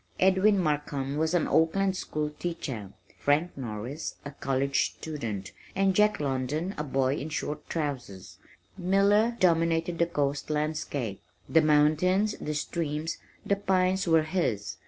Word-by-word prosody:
Edwin 190 +2 +4
Markham 145 -5 -1
was 160 +2 +1
an 175 - +2
Oakland 190 +4 +2
school 150 -4 -3
teacher, 145 - -5 0.3
Frank 150 +5 +1
Norris, 125 +4 -5
a 145 - -5
college 135 0 0
student, 110 - -5 0.2
and 195 0 +3
Jack 210 +1 +4
London 145 +6 -1
a 150 - -3
boy 135 -2 +1
in 150 - -4
short 150 -1 -4
trousers. 100 - -4 0.4
Miller 200 +5 +3
dominated 165 -1 +2
the 170 - +3
coast 145 -3 -1
landscape. 150 -8 -2 0.3
The 160 - +5
mountains, 155 +7 +3
the 150 - -3
streams, 155 +1 -2 0.3
the 200 - +2
pines 185 -1 +1
were 165 -1 +5
his. 110 - -1
155 Hz, 135 wpm, -28 LUFS, 140-180 Hz, 0.4 s, The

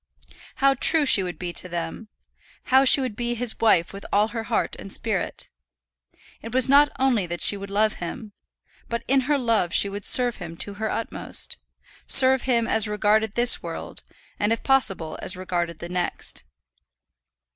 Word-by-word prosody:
How 275 0 +3
true 300 +3 +2
she 215 - +6
would 180 -3 -6
be 175 +1 -6
to 185 - +1
them! 170 +5 -6 0.6
How 265 +1 +3
she 270 - +5
would 255 -5 -4
be 240 +1 -3
his 240 -1 0
wife 185 -7 +2
with 200 - -9
all 210 +2 +2
her 225 -1 -6
heart - - -2
and 195 - -10
spirit! 210 -3 -3 0.9
It 230 +2 -8
was 260 0 +3
not 285 +2 +5
only 245 -8 0
that 175 0 -4
she - - +5
would 200 0 -8
love 215 +2 +1
him; 205 +5 -7 0.6
but 235 0 -4
in 270 +1 +1
her 295 - +3
love 225 -9 0
she 200 - +4
would 200 +1 -7
serve 245 +2 +2
him 170 -3 -9
to 205 - -4
her 220 +2 -4
utmost; 230 - -2 0.5
serve 265 -1 +6
him 235 -2 +1
as 220 -1 0
regarded 210 0 0
this 240 0 +5
world, - - -7 0.4
and 205 +1 0
if 230 - -2
possible 195 - 0
as 185 - -4
regarded 175 -3 -4
the 170 - -8
next. 180 0 -4
220 Hz, 180 wpm, -23 LUFS, 185-245 Hz, 0.9 s, she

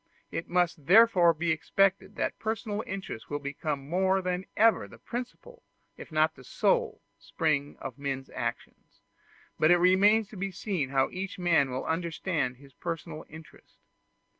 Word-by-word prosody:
It 165 - -4
must 175 -5 0
therefore 190 -3 +7
be 165 +1 -1
expected 195 +5 +1
that - - -2
personal 220 -1 -3
interest 190 -12 -6
will 145 - -2
become 140 0 -4
more 190 +3 +2
than 180 0 -2
ever 225 +1 +4
the - - -14
principal, 255 - -7 0.3
if - - -11
not 155 0 +2
the 130 - -15
sole, - - 0 0.2
spring 145 -3 -1
of 135 -1 -7
men's 135 -1 -4
actions; - - -6 0.6
but 155 - +4
it 175 - +7
remains 195 +5 +4
to 210 - -11
be 195 +2 -2
seen 185 -6 -3
how 135 -1 +1
each 190 +1 -5
man 170 -6 +3
will 130 +1 -4
understand 160 -5 -2
his 140 0 -17
personal 165 -1 -6
interest. 160 +1 -14
170 Hz, 155 wpm, -29 LUFS, 145-195 Hz, 0.6 s, therefore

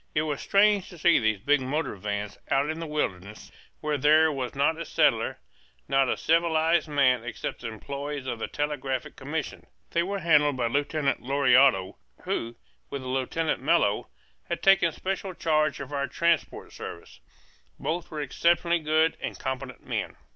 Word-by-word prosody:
It 155 - +2
was 150 -3 -3
strange 205 -1 +3
to 175 - -12
see 170 +1 +4
these 110 -2 +1
big 145 +8 +2
motor 145 +1 -2
vans 105 +1 -4
out 140 +3 +2
in 160 - -6
the 165 - -5
wilderness 105 -9 -4 0.3
where 150 -1 -1
there 155 +3 +5
was 135 -2 -4
not 150 +4 +1
a - - -3
settler, - - +1 0.5
not 135 -1 +2
a - - 0
civilized 165 0 +2
man 135 -5 +2
except 120 - -5
the 120 - -4
employees 140 +5 -6
of 120 -3 -4
the - - -3
Telegraphic 140 -3 -3
Commission. 145 +3 -5 0.2
They 170 - +2
were 195 +3 -2
handled 150 -6 +3
by 120 - 0
Lieutenant 145 +3 0
Lauriado, 130 -6 +3 0.3
who, 115 +1 -3 0.3
with 140 -2 -5
Lieutenant 130 +4 -1
Mello, 140 -9 +2 0.4
had - - -4
taken 195 -4 +5
special 190 +2 -4
charge 155 -2 +1
of 140 +1 -7
our 140 0 -1
transport 170 -2 0
service; 85 -7 -9 0.6
both 165 +4 -3
were 155 -1 -5
exceptionally 170 +4 +2
good 155 +1 +2
and - - -4
competent 130 -1 -5
men. - - -3
145 Hz, 160 wpm, -27 LUFS, 130-160 Hz, 0.6 s, there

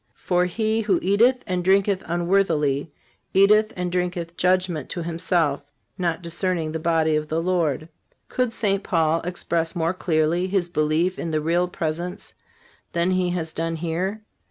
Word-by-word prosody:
For, 180 -1 +1
he 220 +4 0
who 200 -4 +2
eateth 235 +7 +3
and 180 -1 -2
drinketh 195 +1 +3
unworthily, 165 -5 +1 0.4
eateth 210 +3 +5
and 180 -1 -2
drinketh 175 -1 -2
judgment 180 -5 +1
to 175 - -3
himself, 165 -3 0 0.3
not 175 -1 -2
discerning 170 -1 -1
the 160 - -3
body 160 -1 +2
of 155 0 -1
the 160 +2 -1
Lord."(375) 165 -4 0 0.4
Could 250 -2 0
St. 200 -3 0
Paul 165 -3 +1
express 170 -1 -2
more 165 0 0
clearly 170 0 +1
his 185 -2 0
belief 160 +3 0
in 170 - -3
the 155 -1 0
Real 170 +3 +1
Presence 175 +2 -4 0.6
than 170 +2 +1
he 185 -1 +1
has 165 -3 -3
done 165 0 -2
here? 175 +6 -3
175 Hz, 155 wpm, -23 LUFS, 165-185 Hz, 0.6 s, eateth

